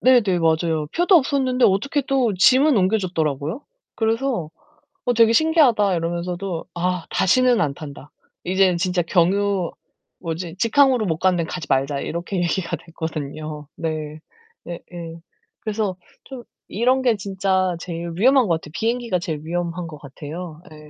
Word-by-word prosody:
네네 235 -8 +4
맞아요. 160 -1 +1
표도 355 +1 +5
없었는데 260 -3 +2
어떻게 275 +9 +2
또 260 -5 +2
짐은 260 +8 +5
옮겨 195 +3 +3
줬더라고요. 160 - -2 0.3
그래서 225 - -1 0.6
"어 245 - +2
되게 230 0 +5
신기하다." 250 - +4
이러면서도 175 +1 -3
"아 180 -1 -1
다시는 240 +5 +3
안 145 -4 0
탄다. 145 -1 -10 0.3
이제는 185 -1 +2
진짜 180 0 0
경유 190 +1 +1 0.5
뭐지 165 0 -5
직항으로 245 +1 +3
못 160 -3 -1
가는데 180 -3 +2
가지 160 -3 -6
말자." 140 +1 +1
이렇게 170 +3 -4
얘기가 175 0 -1
됐거든요. 155 -2 -6
네. 155 -2 -4 0.5
예예. 170 -1 -8 0.5
그래서 210 -3 -2 0.3
좀 260 -3 -9 0.2
이런 255 +5 +1
게 240 -4 +3
진짜 190 -2 0
제일 170 0 -5
위험한 255 +3 +4
것 165 -2 +1
같아. 150 - -12
비행기가 230 -4 -1
제일 160 -3 -4
위험한 170 +1 -3
것 155 -2 -9
같아요. 155 +4 -8
예. 150 -1 -13
180 Hz, 320 characters per minute, -22 LUFS, 165-225 Hz, 0.6 s, 표도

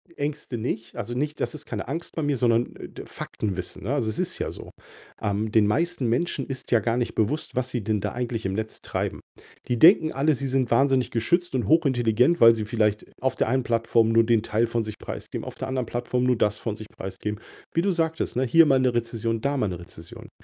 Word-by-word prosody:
Ängste 145 -3 -4
nicht. 115 0 -4
Also, 120 0 -4
nicht 150 +3 -2
das - - -1
ist 150 -1 -8
keine 105 -9 -5
Angst 165 +5 -5
bei 160 - -2
mir, 145 -2 +1
sondern, 115 0 +1
äh, - - -8
d - - -10
Faktenwissen, 95 -4 -5
ne? 120 +8 -1
Also, 120 -6 0
es 110 - -2
ist - - -1
ja - - -2
so. - - -9 0.5
Ähm, 105 +1 -1
den 110 -2 +4
meisten 165 +5 0
Menschen 135 +3 0
ist 130 -2 -6
ja 120 - +5
gar 115 +2 0
nicht 120 -1 -1
bewusst, 135 +9 -1
was 130 0 0
sie 120 -4 -2
denn 105 +1 0
da - - -3
eigentlich 120 -3 -3
im 95 - -1
Netz 110 +2 -4
treiben. - - -3 0.5
Die 125 -1 0
denken 160 - +6
alle, 145 +3 +2
sie 135 0 -3
sind 130 -2 0
wahnsinnig 135 +1 +3
geschützt 170 +8 0
und 125 - 0
hochintelligent, 130 -1 +3
weil 115 0 +8
sie 110 -1 -3
vielleicht 105 -1 0 0.2
auf 130 +1 0
der - - 0
einen 130 +1 +1
Plattform 115 -1 +2
nur 115 0 +5
den 115 -1 +2
Teil 115 +1 +1
von 115 0 -1
sich 110 -1 -7
preisgeben, - - -6
auf - - -7
der - - -5
anderen 130 -2 -1
Plattform 120 +2 -2
nur 125 -1 +2
das 105 -1 +1
von 110 -2 -4
sich 110 -1 -9
preisgeben. 100 +3 -6 0.3
Wie 165 - +2
du 195 +2 +1
sagtest, 160 -6 -1
ne, 130 - +2
hier 165 +7 +6
mal 135 -3 +4
'ne 130 -1 +2
Rezession, 115 -1 -1
da 140 +3 0
mal 110 - +1
'ne 90 -3 -5
Rezession. 85 -2 -12
120 Hz, 235 wpm, -25 LUFS, 110-135 Hz, 0.5 s, weil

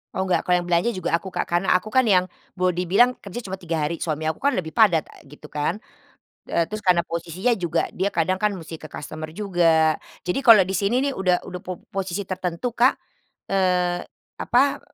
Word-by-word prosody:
Oh 190 0 -1
nggak, 185 - +1
kalau 180 - +2
yang 175 - -6
belanja 175 +6 +2
juga 185 -5 -1
aku 190 +2 -5
Kak, - - -2
karena 175 +2 +1
aku 185 +3 +2
kan 260 +4 +3
yang 185 -5 +3 0.3
boleh 180 -1 +2
dibilang 240 +8 +4
kerja 200 +3 -6
cuma 190 - -4
3 170 -3 -3
hari, 170 - -3
suami 155 -1 -2
aku 160 - -3
kan 285 - +4
lebih 170 - -4
padat, 185 -8 +4
a - - -17
gitu 150 +1 -14
kan. 150 +7 -2 0.7
Eee, 170 - +1
terus 215 +6 -5
karena 180 -4 +3
posisinya 170 +7 -2
juga, 175 -3 -1
dia 190 - -1
kadang 185 0 0
kan 210 0 +1
mesti 165 -2 -8
ke 155 - -9
customer 155 +2 -8
juga. 165 -6 +2 0.2
Jadi, 180 +9 -1
kalau 230 -7 +8
di 185 - -5
sini 200 +7 +1
nih 280 - 0
udah 185 -7 0
udah 180 - -7
po 180 -1 -8
posisi 195 -1 -3
tertentu 185 +4 -3
Kak, 245 +3 +3 0.6
eee, 180 -2 +1 0.4
apa, 270 +3 +2
180 Hz, 205 wpm, -23 LUFS, 170-200 Hz, 0.7 s, kalau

